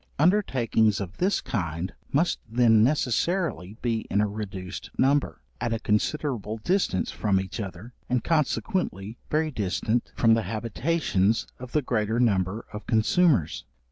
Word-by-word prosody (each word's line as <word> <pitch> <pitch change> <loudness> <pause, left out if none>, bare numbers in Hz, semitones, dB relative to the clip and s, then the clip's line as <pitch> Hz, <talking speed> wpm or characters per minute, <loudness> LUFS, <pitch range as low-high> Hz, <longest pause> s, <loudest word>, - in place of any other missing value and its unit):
Undertakings 130 - +2
of 100 -1 -6
this 190 +3 +1
kind 85 -3 -3 0.2
must 165 +5 +2
then 115 -2 +5
necessarily 130 - 0
be 115 -2 -1
in 100 - +1
a 105 - +3
reduced 100 -3 -6
number, 140 +2 +1 0.2
at 120 -2 -1
a 115 - -1
considerable 110 0 -1
distance 175 - 0
from 100 -3 +1
each 95 +4 -5
other, 100 +3 -7 0.2
and 125 -1 +1
consequently 150 - -1
very 155 0 +1
distant 110 +1 -1
from 115 -1 +4
the 115 - +3
habitations 110 - 0
of 125 -1 -9
the 150 - +2
greater 110 -2 0
number 100 -3 +1
of 105 0 -7
consumers. 115 - +2
115 Hz, 140 wpm, -26 LUFS, 100-140 Hz, 0.2 s, then